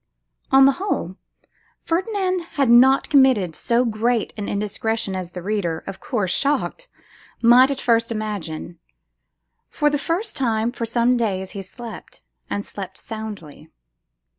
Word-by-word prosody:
On 270 0 +7
the 275 - +6
whole, 285 - -2 0.7
Ferdinand 370 +1 0
had 275 -4 +2
not 260 +3 +6
committed 255 - +4
so 235 +7 +1
great 230 0 0
an 205 -2 -5
indiscretion 210 0 -2
as 180 -2 -5
the 180 - -7
reader, 185 -5 -2
of 195 - -7
course 210 -8 -2
shocked, 295 - -1 0.5
might 245 +3 +6
at 275 -1 -2
first 230 -2 +2
imagine. 175 -7 -5 0.9
For 295 -1 +1
the 290 - 0
first 360 +9 -2
time 230 -3 0
for 235 -2 -4
some 240 +2 +2
days 190 -5 -2
he 200 - -6
slept, 225 +5 -10 0.3
and 205 - -3
slept 190 -2 -8
soundly. 215 -9 -8
230 Hz, 140 wpm, -22 LUFS, 200-265 Hz, 0.9 s, On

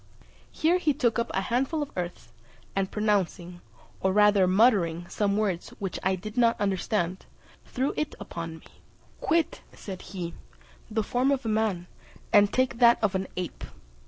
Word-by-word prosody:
Here 340 +3 +2
he 300 -5 +1
took 235 -5 +1
up 235 - -1
a 190 - 0
handful 265 +9 0
of 285 - -9
earth, 175 -1 -5 0.4
and 195 -1 0
pronouncing, 190 -4 -1 0.4
or 190 - +1
rather 205 -1 +5
muttering, 185 -5 +3
some 200 +1 0
words 195 -5 -1
which 195 -3 -4
I 190 0 +1
did 215 +5 -8
not 235 -2 +3
understand, 190 -2 -1 0.4
threw 265 +3 -1
it 305 -1 -2
upon 165 -1 -6
me. - - -18 0.5
"Quit," 330 0 0
said 190 -3 -8
he, 175 -2 -6 0.6
"the 220 0 0
form 250 +5 +1
of 275 -3 0
a - - 0
man, 215 -5 0 0.5
and 205 -1 +6
take 255 -2 0
that 235 -1 +7
of 205 - +2
an 190 0 -1
ape." 180 -2 -5
205 Hz, 160 wpm, -27 LUFS, 185-235 Hz, 0.6 s, that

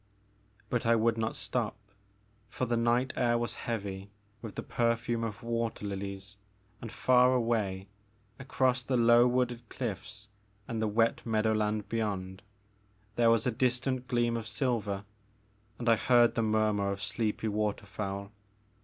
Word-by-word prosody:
But 120 -1 0
I 115 0 +4
would 115 0 +2
not 110 -1 -2
stop, 120 -4 -2 0.7
for 130 - -2
the 120 -1 0
night 120 +3 +1
air 120 -2 +2
was 120 0 -2 0.2
heavy 100 -3 -4 0.3
with 110 -3 -8
the - - -4
perfume 115 0 0
of 115 +1 -5
water 115 -2 -2
lilies 100 0 -5 0.4
and 115 - -7
far 125 0 +4
away, 105 -6 0 0.5
across 130 -1 +1
the 130 0 0
low 120 +1 +6
wooded 125 -1 -1
cliflFs 105 -3 -5 0.4
and 115 -1 -3
the 110 - +1
wet 115 +2 +1
meadowland 110 -2 0
beyond, 100 -4 -3 0.7
there 120 -1 +4
was 115 -1 +3
a 125 - +2
distant 125 +2 0
gleam 120 -2 +1
of 115 -1 -4
silver, 105 -4 -1 0.7
and 120 - -5
I 115 -1 +5
heard 120 +1 +4
the 115 - 0
murmur 110 -2 +1
of 100 0 -5
sleepy 110 +2 -1
waterfowl. 100 -1 -3
115 Hz, 145 wpm, -30 LUFS, 105-120 Hz, 0.7 s, low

